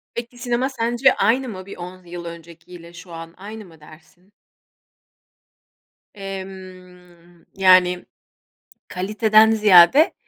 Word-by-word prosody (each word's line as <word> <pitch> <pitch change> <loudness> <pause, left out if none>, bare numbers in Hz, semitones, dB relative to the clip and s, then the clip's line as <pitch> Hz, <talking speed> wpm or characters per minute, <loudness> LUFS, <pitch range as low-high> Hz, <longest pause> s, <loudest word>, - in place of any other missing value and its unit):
Peki, 240 +1 -7
sinema 245 +2 -2
sence 240 +1 +1
aynı 245 +5 0
mı? 185 -3 -9
Bir 195 - -11
10 180 +1 -10
yıl 175 0 -9
öncekiyle 170 +1 -13
şu 180 0 -14
an 165 0 -10
aynı 215 +2 -10
mı 165 -3 -19
dersin? 170 +6 -20 1.8
Emm, 185 -3 -12
yani, 185 -2 +3 0.8
kaliteden 215 +3 +2
ziyade, 215 - +5
185 Hz, 105 wpm, -20 LUFS, 175-220 Hz, 1.8 s, ziyade